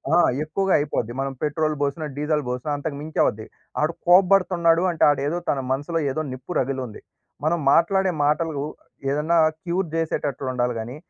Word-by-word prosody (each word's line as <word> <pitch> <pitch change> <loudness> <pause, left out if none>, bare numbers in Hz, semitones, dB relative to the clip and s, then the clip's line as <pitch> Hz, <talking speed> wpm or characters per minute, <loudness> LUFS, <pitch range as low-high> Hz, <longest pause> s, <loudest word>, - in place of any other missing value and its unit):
ఆ! - - +5 0.3
ఎక్కువగా 190 +5 0
అయిపోద్ది. 130 -5 -2
మనం 135 0 -2
పెట్రోల్ 155 +1 0
బోసినా, 145 +2 -1
డీజిల్ 150 0 0
బోసినా 125 +4 -3
అంతకు 145 0 -4
మించి 155 +1 -5
అవుద్ది. 110 +1 -1 0.4
ఆడు 155 +2 +1
కోబ్బడుతున్నాడు 180 -2 +4
అంటే 165 - -1
ఆడేదో, 145 +3 0
తన 140 - +1
మనసులో 145 +5 -1
ఏదో 155 +3 -2
నిప్పు 130 +7 -7
రగిలుంది. 130 -4 -3 0.4
మనం 170 +2 +2
మాట్లాడే 190 +2 +3
మాటలు 155 +1 +1 0.6
ఏదన్నా 155 +4 +1 0.2
క్యూర్ 180 0 -1
జేసేటట్లుండాలి 130 -6 -1
గాని, 120 +4 -6
155 Hz, 145 wpm, -23 LUFS, 135-170 Hz, 0.6 s, ఆ